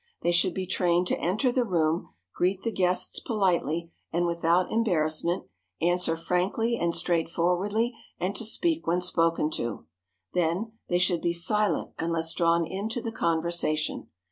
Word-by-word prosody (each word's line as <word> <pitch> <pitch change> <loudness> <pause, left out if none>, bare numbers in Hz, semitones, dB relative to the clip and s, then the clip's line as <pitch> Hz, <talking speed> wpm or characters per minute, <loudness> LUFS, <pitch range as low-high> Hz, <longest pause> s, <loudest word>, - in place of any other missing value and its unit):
They 175 - +3
should 175 +1 +2
be 190 - -2
trained 180 -1 +2
to - - 0
enter 215 +9 +1
the 250 0 +2
room, 165 -5 0 0.2
greet 185 +2 0
the 230 - 0
guests 180 -2 0
politely 170 - 0 0.2
and 175 +1 +1
without 170 +1 +2
embarrassment, 170 -5 +1 0.3
answer 175 -1 +1
frankly 190 +8 0
and 170 -6 0
straightforwardly, 180 +7 +1 0.3
and 185 +3 -1
to 230 - 0
speak 325 - -1
when 175 +2 +2
spoken 165 -3 +1
to. 115 -7 -3 0.5
Then, 180 +5 0 0.2
they 175 - +2
should 180 -2 +2
be 170 - +1
silent 210 +5 0
unless 165 0 -1
drawn 170 0 +2
into 200 +7 -3
the 230 -1 -4
conversation. 165 -4 0
175 Hz, 145 wpm, -27 LUFS, 170-195 Hz, 0.5 s, They